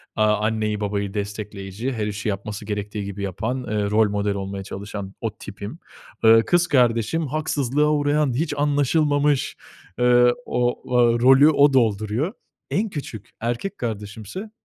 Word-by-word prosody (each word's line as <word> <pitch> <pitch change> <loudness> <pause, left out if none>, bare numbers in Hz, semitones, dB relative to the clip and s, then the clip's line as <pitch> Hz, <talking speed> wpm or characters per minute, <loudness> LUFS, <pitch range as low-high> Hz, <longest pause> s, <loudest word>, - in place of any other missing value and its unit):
aaa, 105 -1 +3
anneyi 110 -1 -1
babayı 100 -1 -2
destekleyici, 105 +2 -4
her 110 -3 -2
işi 105 +1 -3
yapması 105 +2 -5
gerektiği 105 0 -4
gibi 100 0 -6
yapan, 110 +7 -3
eee, 105 -3 -1
rol 105 -1 +4
model 100 0 -1
olmaya 95 0 -5
çalışan 100 0 -7
o 110 -2 -4
tipim. 105 +9 -8 0.4
Eee, 115 0 +7
kız 175 0 +3
kardeşim 125 +2 +2
haksızlığa 150 -1 0
uğrayan, 145 -2 +1
hiç 150 +4 -1
anlaşılmamış, 145 0 +1 0.4
eee, 125 0 +5
ooo, 125 0 0
o 120 -1 +4
rolü 135 +4 +7
o 145 -2 +4
dolduruyor. 115 - +1 0.4
En 215 +3 0
küçük 130 - -7
erkek 120 - -3
kardeşimse, 110 - -6
115 Hz, 140 wpm, -23 LUFS, 105-145 Hz, 0.4 s, Eee